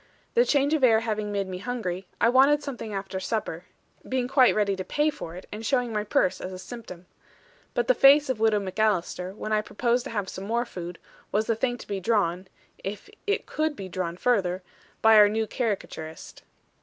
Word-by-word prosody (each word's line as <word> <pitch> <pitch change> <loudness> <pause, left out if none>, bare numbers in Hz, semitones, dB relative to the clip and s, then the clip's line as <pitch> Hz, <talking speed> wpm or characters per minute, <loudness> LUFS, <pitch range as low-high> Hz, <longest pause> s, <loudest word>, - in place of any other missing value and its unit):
The 480 +1 +4
change 285 - +2
of 305 -4 +1
air 225 -3 +6
having 215 -2 -2
made 200 -1 -1
me 185 -1 -5
hungry, 195 -5 -4
I - - +4
wanted 275 +4 +5
something 240 -6 -6
after 195 -1 -4
supper; 185 -4 -3 0.4
being 255 -1 0
quite 260 -1 +5
ready 205 -2 +2
to 185 - -3
pay 295 +10 +1
for 170 - -8
it, 185 - -9
and 215 +2 -6
showing 245 -1 0
my 210 -1 0
purse 190 -3 +1
as 185 - -5
a 185 - -7
symptom. 185 -4 -9 0.7
But - - +1
the - - +6
face 285 - +6
of 260 -4 -1
Widow 220 -2 +3
MacAlister, 190 -2 -1
when 215 - -5
I 215 0 +3
proposed 240 +3 0
to - - -5
have 205 -4 -2
some 190 - -7
more 235 +3 0
food, 175 -6 -7 0.3
was 215 +2 +1
a - - +1
thing 245 +2 -1
to - - -11
be 200 -1 -3
drawn 190 -3 0 0.4
(if 210 - -6 0.2
it 410 - 0
could 310 -1 -1
be 195 -7 -7
drawn 175 -1 -4
further) 185 -6 +1 0.4
by 220 0 +7
our 210 -1 +8
new 220 +1 0
caricaturist. 200 -9 -4
215 Hz, 205 wpm, -26 LUFS, 190-245 Hz, 0.7 s, our